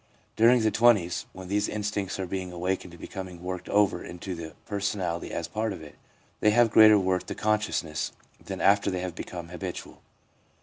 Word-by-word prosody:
During 120 +2 +5
the 110 - +3
twenties, 110 -7 +3
when 95 0 -10
these 105 +2 0
instincts 105 -2 -3
are 95 - -1
being 90 0 -4
awakened 90 0 -3
and - - -16
becoming 95 -2 -8
worked 90 0 -5
over 100 -4 +2
into 90 +2 -6
the 80 -3 -8
personality 100 -4 -2
as 85 - -3
part 110 +1 -2
of 90 -5 -7
it, 75 - -11 0.5
they 105 - +4
have 115 +1 +4
greater 110 0 +8
worth 95 -2 0
to - - -4
consciousness 105 -7 -1 0.3
than - - -6
after 100 0 +4
they 90 -2 -2
have 90 -2 -4
become 85 -1 -7
habitual. 90 -1 -7
95 Hz, 180 wpm, -27 LUFS, 90-105 Hz, 0.5 s, greater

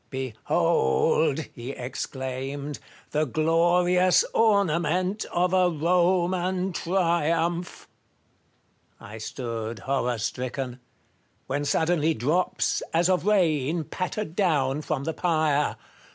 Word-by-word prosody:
" - - -40
Behold," 130 - +1
he 120 +3 -7
exclaimed, 135 +3 -5 0.2
" - - -26
the 155 +1 +1
glorious 175 +5 +3
ornament 185 -2 +2
of 180 +1 +1
a 185 -1 +4
Koman 180 +2 +1
triumph! 170 -1 0 0.6
" - - -41
I 105 +2 -10
stood 115 0 -5
horror 125 -3 -1
stricken; 125 +3 -4 0.7
when 145 +2 -2
suddenly 160 +1 +1
drops, 155 +10 0
as 170 +2 +3
of 185 +1 +1
rain, 165 -6 +2
pattered 185 +2 -4
down 150 -8 +1
from 140 - -3
the 160 - -2
pyre. 155 -4 +1
160 Hz, 105 wpm, -26 LUFS, 135-180 Hz, 0.7 s, a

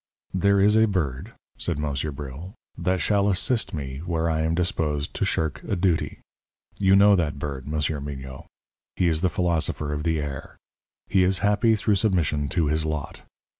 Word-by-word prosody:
"There 100 +2 +3
is 105 +2 +4
a 110 0 +6
bird," 90 - -2 0.3
said - - -1
Monsieur 75 0 -2
Bril, 75 +6 -8 0.2
"that 90 0 0
shall 100 -1 +2
assist 110 +5 +1
me 70 -4 -5
where 85 0 -1
I 80 0 0
am 80 +1 0
disposed 80 -5 -1
to - - -1
shirk 80 -3 -1
a - - -2
duty. 90 -2 0 0.6
You 95 -1 +5
know 100 +1 +7
that 80 -6 -1
bird, 70 -2 -5
Monsieur 75 0 -1
Mignot; 65 -2 -7 0.5
he 90 - +2
is 80 -1 +1
the 90 - +2
philosopher 80 -4 -1
of 75 - -3
the 80 0 0
air. 70 -2 -6 0.5
He 95 - +3
is 95 +1 +2
happy 105 +2 +3
through 105 -1 +1
submission 85 -8 +1
to 85 -1 +1
his 75 +1 0
lot. 75 -2 -4
80 Hz, 175 wpm, -25 LUFS, 75-95 Hz, 0.6 s, know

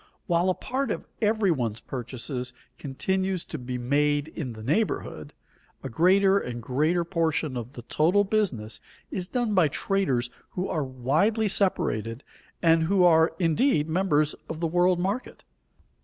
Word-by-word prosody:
While 175 0 +2
a 185 - +1
part 270 +2 -2
of - - -3 0.2
every 215 -3 +2
one's 115 -7 -1
purchases 125 0 -5 0.3
continues 190 +6 -2
to 155 - -6
be 125 0 -4
made 145 +4 +1
in 140 -7 -5
the 110 -1 -10
neighborhood, 130 - -1 0.5
a 135 - -4
greater 190 - +4
and 120 -7 -5
greater 155 +9 +1
portion 165 -5 -1
of 120 +2 -6
the 120 - -9
total 175 - +2
business 135 - -1 0.3
is 180 -2 -3
done 240 -1 -1
by 180 -5 +5
traders 135 -7 0 0.2
who 180 +1 -2
are 155 - -1
widely 155 - +1
separated 120 - 0 0.4
and 165 -1 +4
who 190 +2 +3
are 160 -2 +5
indeed 165 - +2
members 160 -3 +1 0.2
of 160 - -5
the 170 - -1
world 175 +2 +3
market. 200 +7 -3
160 Hz, 150 wpm, -26 LUFS, 130-190 Hz, 0.5 s, by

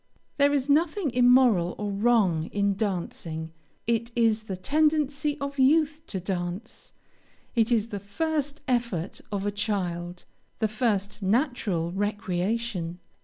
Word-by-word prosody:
There 285 0 +4
is 280 -2 0
nothing 310 +2 +2
immoral 245 -7 +4
or 205 -1 -3
wrong 200 -6 +2
in 200 0 +1
dancing; 170 -5 -3 0.3
it 230 0 0
is 225 -2 +3
the 190 -3 -4
tendency 295 +4 +1
of 280 0 -4
youth 305 +3 +3
to 190 - -4
dance 180 +1 -5 0.6
it 230 -1 +2
is 230 -1 +2
the 205 - -4
first 290 - -2
effort 235 -8 -1
of 200 -1 -2
a 205 - +1
child 180 -4 -3 0.3
the 220 - +1
first 215 -2 -1
natural 200 - 0
recreation. 200 -1 -2
215 Hz, 125 wpm, -27 LUFS, 190-265 Hz, 0.6 s, There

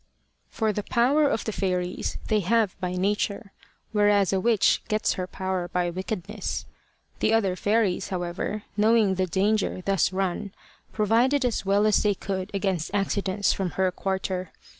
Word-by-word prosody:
For 220 -2 0
the 210 - -2
power 265 +8 +3
of 220 - -1
the 220 - -1
fairies 180 -3 -2
they 215 - +2
have 210 +1 +1
by 180 -1 -2
nature; 200 +2 -1 0.4
whereas 205 -2 +3
a 190 - +2
witch 220 0 +3
gets 215 0 +1
her 185 -1 -4
power 185 -1 -3
by 175 -1 -1
wickedness. 190 +2 -4 0.5
The - - +2
other 195 -5 +1
fairies, 205 -1 +1
however, 185 +3 -3
knowing 215 -1 +4
the 185 0 0
danger 195 0 0
thus 195 -3 +2
run, 190 +1 -2 0.4
provided 240 +6 +2
as 230 -5 -1
well 200 +2 +3
as 215 - +4
they 205 -1 +2
could 190 0 -4
against 190 -5 -1
accidents 200 0 +1
from 185 -4 -3
her 190 -1 +2
quarter. 190 -1 -3
195 Hz, 155 wpm, -26 LUFS, 185-215 Hz, 0.5 s, knowing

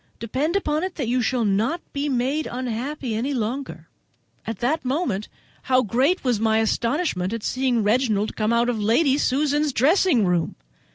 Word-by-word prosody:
Depend 270 - -2
upon 305 -6 0
it 370 -1 -3
that 270 -7 -3
you 250 +2 +1
shall 240 0 0
not 215 - +1
be 285 +1 -1
made 270 +4 0
unhappy 250 +1 -4
any 255 +6 -1
longer." 230 - -4 0.6
At 225 -2 -3
that 280 +9 0
moment 255 - -1 0.3
how 255 0 +2
great 260 - +1
was 245 -5 +1
my 220 0 +2
astonishment 225 - 0
at 230 -2 -4
seeing 255 -3 0
Reginald 215 -1 +1
come 215 +1 0
out 235 +1 +2
of 240 -3 -1
Lady 265 +7 +3
Susan's 290 +2 +1
dressing 280 - +3
room. 175 -2 0
250 Hz, 165 wpm, -23 LUFS, 220-285 Hz, 0.6 s, Lady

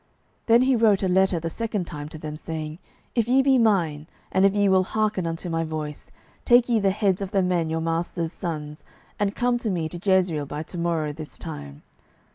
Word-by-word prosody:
12:010:006 - - -40 0.4
Then 230 +1 +6
he 260 0 +3
wrote 215 -4 +3
a - - +2
letter 190 -1 +3
the 165 +1 -3
second 220 -3 -2
time 150 -2 -7
to 155 - -9
them, 150 0 -6
saying, 155 0 -6 0.3
If 230 -2 +1
ye 265 +2 +4
be 265 -1 +4
mine, 170 -9 +1 0.2
and 190 +1 +5
if 195 - -1
ye 205 -1 +3
will 190 -1 +5
hearken 210 -3 -1
unto 165 +2 -4
my 165 -1 -1
voice, 155 -2 -5 0.3
take 240 0 +5
ye 235 -3 +2
the 200 -1 +2
heads 195 -1 +1
of 195 - -3
the 195 -1 +1
men 175 -3 0
your 160 0 -1
master's 165 +1 -2
sons, 150 -3 -5 0.4
and 205 0 0
come 245 0 +1
to 230 - -2
me 170 -5 -1
to 175 - -7
Jezreel 180 -7 +2
by 150 +2 -4
to 175 - -9
morrow 165 -3 -1
this 155 0 -9
time. 70 0 -8
180 Hz, 220 wpm, -24 LUFS, 160-205 Hz, 0.4 s, Then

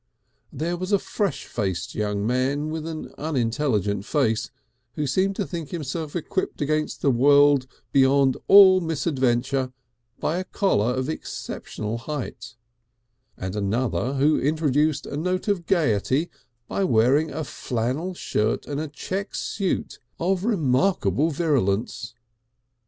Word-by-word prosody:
There 170 +5 -2
was 185 +3 -4
a 200 - +5
fresh 195 -4 -2
faced 95 -6 -3
young 105 -1 -1
man 135 +5 0
with 160 0 -4
an 160 -1 -6
unintelligent 115 - 0
face 115 -3 0 0.5
who 150 - -1
seemed 190 +8 +1
to 200 - -1
think 165 -5 -6
himself 155 -1 -4
equipped 175 +2 -2
against 155 +1 -1
the 140 - +4
world 140 +1 +5 0.2
beyond 135 0 +4
all 190 -2 +8
misadventure 135 -5 0 0.5
by 170 +4 0
a - - -2
collar 125 - +1
of 130 0 -2
exceptional 115 -7 -5
height, 130 -2 -6 0.8
and 95 +1 -5
another 120 +5 -1
who 145 +3 +3
introduced 150 0 +1
a - - -6
note 180 +6 -1
of 190 -5 0
gaiety 150 - +1 0.4
by 195 - -1
wearing 135 +3 +3
a 155 +3 -4
flannel 130 +8 -3
shirt 110 -8 -1
and 145 0 -4
a 155 - -3
check 190 +7 -5
suit 195 -3 -2 0.2
of 185 +2 0
remarkable 165 - +2
virulence. 120 - -1
145 Hz, 130 wpm, -24 LUFS, 125-165 Hz, 0.8 s, all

